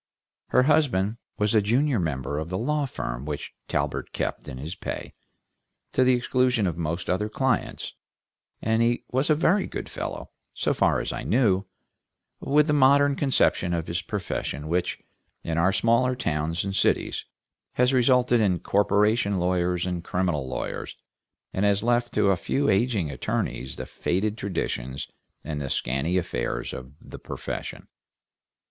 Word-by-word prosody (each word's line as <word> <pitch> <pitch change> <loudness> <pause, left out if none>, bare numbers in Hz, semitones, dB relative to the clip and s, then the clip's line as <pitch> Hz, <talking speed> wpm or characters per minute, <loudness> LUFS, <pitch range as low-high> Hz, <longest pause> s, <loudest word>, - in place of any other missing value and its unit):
Her 125 - +4
husband 125 -8 +2 0.2
was 105 -2 +1
the 110 - +4
junior 125 +4 +2
member 75 -3 -2
of 80 +2 -5
the 90 - -2
law 145 +5 0
firm 60 - -4
which 75 -1 -5
Talbert - - -2
kept - - -3
in 65 - -6
his 75 +6 -5
pay, 95 - -6 0.8
to 130 - +3
the 130 0 +5
exclusion 125 -2 +2
of 85 -4 0
most 85 +1 -3
other 105 +4 0
clients, 130 +4 -1 0.7
and 110 +1 +2
he 120 +1 +2
was 130 +4 +1
a 155 - +5
very 185 +6 +2
good - - -5
fellow, - - -5 0.2
so - - +1
far - - +2
as - - -3
I - - -4
knew, 105 -6 +2 0.7
with 150 +2 +3
the 150 - +1
modern 140 0 +5
conception 110 -11 +2
of 80 -1 -2
his 85 +2 -2
profession 85 -8 -4
which, 90 +2 0 0.5
in 80 0 -1
our 90 +3 +4
smaller 115 +6 +2
towns 80 -5 -1
and 100 0 -3
cities, - - +1 0.5
has 125 +2 +3
resulted 125 -1 +4
in 95 -4 +3
corporation 100 +2 +2
lawyers 90 0 +1
and 90 -2 -3
criminal 90 -7 -1
lawyers, 65 - -4 0.6
and 95 - 0
has 100 0 +3
left 120 0 +2
to 100 - +4
a 95 - +2
few 140 +10 0
aging 100 - +1
attorneys 65 0 -3
the - - -5
faded 100 +4 -1
traditions 70 - -3 0.4
and 75 0 -4
the 70 - -3
scanty 70 +10 0
affairs 90 - -2
of 65 +1 -8
the - - -11
profession. - - -6
100 Hz, 155 wpm, -26 LUFS, 85-125 Hz, 0.8 s, the